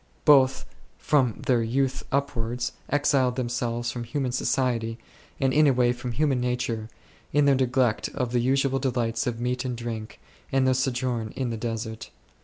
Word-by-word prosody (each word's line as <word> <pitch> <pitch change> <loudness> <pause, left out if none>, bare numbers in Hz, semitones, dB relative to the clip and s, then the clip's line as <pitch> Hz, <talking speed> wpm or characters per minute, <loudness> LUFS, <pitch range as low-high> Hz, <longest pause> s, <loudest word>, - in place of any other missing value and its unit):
Both, 135 -3 +5 0.3
from 135 -4 +1
their 125 -4 +3
youth 135 +3 0
ur> 140 +1 +2
wards, 120 +2 -2 0.2
exiled 135 -3 +2
themselves 120 -1 -2
from 120 -1 -5
human 125 +2 -2
society, 120 -3 0 0.4
and 135 -1 +2
in 155 0 +5
a 135 - +5
way 125 -1 +3
from 120 0 -5
human 135 0 +1
nature, 125 -3 -2 0.4
in 145 0 +3
their 140 - +5
neglect 130 -3 +1
of 125 -4 -1
the 125 - +2
usual 135 +1 +2
kinds 120 -4 -1
of 115 -2 -2
meat 125 +2 -1
and 125 -2 -3
drink, 115 -2 -6 0.3
and 135 -1 +3
their 130 - +4
sojourn 125 -3 -1
in 130 -3 -2
the - - -2
desert. 110 -1 -4
125 Hz, 170 wpm, -26 LUFS, 120-135 Hz, 0.4 s, Both